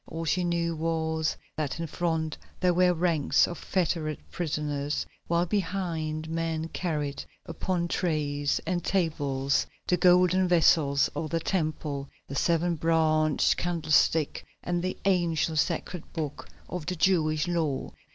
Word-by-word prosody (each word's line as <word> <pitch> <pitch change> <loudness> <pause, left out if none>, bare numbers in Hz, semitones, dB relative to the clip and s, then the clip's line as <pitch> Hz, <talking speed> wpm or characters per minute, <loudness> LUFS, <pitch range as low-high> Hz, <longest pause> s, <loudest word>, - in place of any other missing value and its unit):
All 165 +1 -5
she 180 +4 +1
knew 170 -1 0
was 160 0 -1 0.2
that 155 0 -3
in 165 - -2
front 160 -1 -1 0.2
there 180 -1 +3
were 180 +1 +4
ranks 170 -4 +3
of 175 - -6
fettered 165 -4 -1
prisoners, 150 -3 -2 0.2
while 170 +1 +2
behind 165 -5 -2
men 165 0 -2
carried 150 -6 -3 0.2
upon 175 -2 -2
trays 145 -5 0
and 180 -2 -1
tables 145 -7 0 0.2
the 180 - +2
golden 180 +1 +5
vessels 155 -5 +4
of 155 +1 -4
the 165 - 0
Temple, 155 -5 -2 0.2
the - - -7
seven 170 +3 +1
branched 155 -1 +3
candlestick 160 -2 +2 0.2
and 175 0 -1
the 185 +1 -3
ancient 170 -4 +2
sacred 175 0 -2
book 150 -4 -5 0.2
of 175 -4 -5
the 180 - -1
Jewish 155 -3 +2
law. 160 -6 -1
165 Hz, 130 wpm, -28 LUFS, 155-175 Hz, 0.2 s, golden